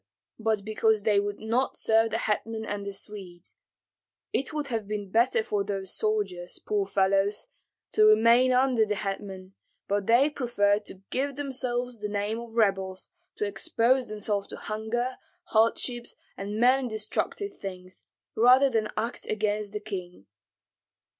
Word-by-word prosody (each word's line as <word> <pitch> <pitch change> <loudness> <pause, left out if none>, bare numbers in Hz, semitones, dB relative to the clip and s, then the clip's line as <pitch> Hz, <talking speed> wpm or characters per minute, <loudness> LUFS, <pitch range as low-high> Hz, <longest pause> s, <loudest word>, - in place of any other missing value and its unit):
but 220 -2 0
because 220 -1 +2
they 210 -2 +4
would 205 0 -3
not 235 +4 0
serve 225 0 +3
the 225 - -1
hetman 220 0 -2
and 205 -1 -4
the - - -2
Swedes. 195 -3 -9 0.8
It 270 - 0
would 300 -1 -2
have 225 -4 -2
been 205 -2 -4
better 230 +1 +3
for 205 -2 -1
those 195 -2 -4
soldiers, 195 -5 -1
poor 205 -2 -1
fellows, 195 +1 +2 0.5
to 215 - +5
remain 230 +4 +6
under 255 -2 +4
the 210 -1 0
hetman, 195 -1 -5 0.3
but 200 -1 0
they 255 +6 +5
preferred 210 -6 +1
to 190 - -12
give 275 +1 -1
themselves 250 -4 -2
the 210 0 -3
name 205 +2 -2
of 235 -1 -10
rebels, 195 -4 0 0.2
to - - -1
expose 230 +5 +1
themselves 210 -1 -2
to - - -8
hunger, 235 +4 -3 0.3
hardships, 235 +2 +1 0.2
and 205 +2 -4
many 255 +2 +4
destructive 230 - -2
things, 185 -1 -8 0.3
rather 255 +4 +6
than 220 -2 0
act 230 +3 -3
against 210 -1 -1
the 210 - -3
king. 180 - -7
215 Hz, 145 wpm, -27 LUFS, 200-235 Hz, 0.8 s, remain